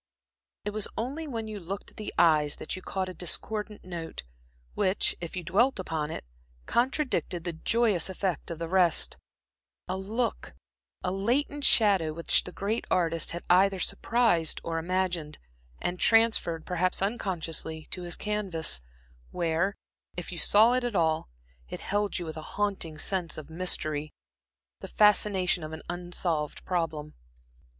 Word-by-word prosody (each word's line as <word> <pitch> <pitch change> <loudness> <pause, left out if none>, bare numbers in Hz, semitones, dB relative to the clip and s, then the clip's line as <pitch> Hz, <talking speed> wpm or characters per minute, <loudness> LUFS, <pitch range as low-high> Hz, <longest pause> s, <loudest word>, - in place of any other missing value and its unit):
It 210 - 0
was 215 0 -1
only 275 +8 -3
when 225 -5 -4
you 215 -1 -5
looked 195 +3 -6
at - - -25
the 215 - -4
eyes 155 -3 +4
that - - -5
you 185 - -7
caught 190 0 -2
a 185 - -6
discordant 210 +4 -3
note, 170 -3 -6 0.5
which, 190 - +2
if 170 0 -5
you 180 - -3
dwelt 215 +11 +3
upon 160 -5 -2
it, 155 - -6 0.4
contradicted 250 - 0
the 175 -1 -3
joyous 205 +1 +2
effect 185 -2 -2
of 170 - -4
the 165 +1 -4
rest; 180 -1 +3 0.7
a 185 - -1
look, 220 +5 -2 0.5
a 180 - 0
latent 270 +9 0
shadow 195 -8 +5
which 170 +1 +2
the 180 - -6
great 205 +5 -2
artist 165 -2 +1
had 170 +1 -4
either 190 +2 +5
surprised 220 -8 +2
or 165 -1 -1
imagined, 175 -3 -1 0.4
and 175 0 -2
transferred 225 -8 +4
perhaps 185 +1 +1
unconsciously 165 -6 -2
to 180 - -4
his 175 -1 -3
canvas, 190 - -2 0.5
where, 175 +3 0 0.4
if 175 - -5
you 175 - -6
saw 220 +4 +6
it 255 0 +2
at 240 -3 -2
all, 160 - +1 0.4
it - - -5
held 205 0 0
you 175 - -4
with 160 -1 -6
a - - -5 0.2
haunting 195 -6 -1
sense 180 -1 0
of 155 0 -8
mystery, 155 -3 0 0.7
the - - -7
fascination 200 -4 +3
of 155 0 -6
an 160 - -7
unsolved 175 -3 -2
problem. 160 -4 -2
180 Hz, 155 wpm, -29 LUFS, 165-210 Hz, 0.7 s, saw